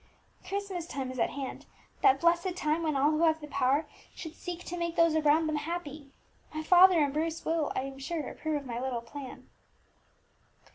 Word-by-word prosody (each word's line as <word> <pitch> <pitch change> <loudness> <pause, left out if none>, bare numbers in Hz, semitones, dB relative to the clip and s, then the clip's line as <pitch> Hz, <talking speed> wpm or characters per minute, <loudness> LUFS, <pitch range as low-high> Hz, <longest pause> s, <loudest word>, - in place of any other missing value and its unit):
"Christmas 390 -4 -4
time 270 -5 -4
is 255 - -7
at 230 - +2
hand, 275 -2 -6 0.3
that 405 -2 +5
blessed 345 +2 +2
time 310 -1 0
when 310 -3 0
all 285 +3 +4
who 310 +1 0
have 320 -1 +3
the 300 - -8
power 280 +1 +1 0.3
should 320 -3 -7
seek 355 -1 -6
to 355 - -5
make 340 -1 -2
those 335 -1 +4
around 310 +1 +4
them 310 -1 0
happy. 300 -3 -5 0.4
My 310 - -3
father 360 +2 +7
and 280 -1 -1
Bruce 325 +2 -2
will, 320 -2 0
I - - +1
am 270 0 -7
sure, 310 +3 -3
approve 310 -2 -3
of - - -11
my 235 -1 -4
little 250 -2 -2
plan." 260 +3 -9
310 Hz, 195 wpm, -30 LUFS, 280-340 Hz, 0.4 s, father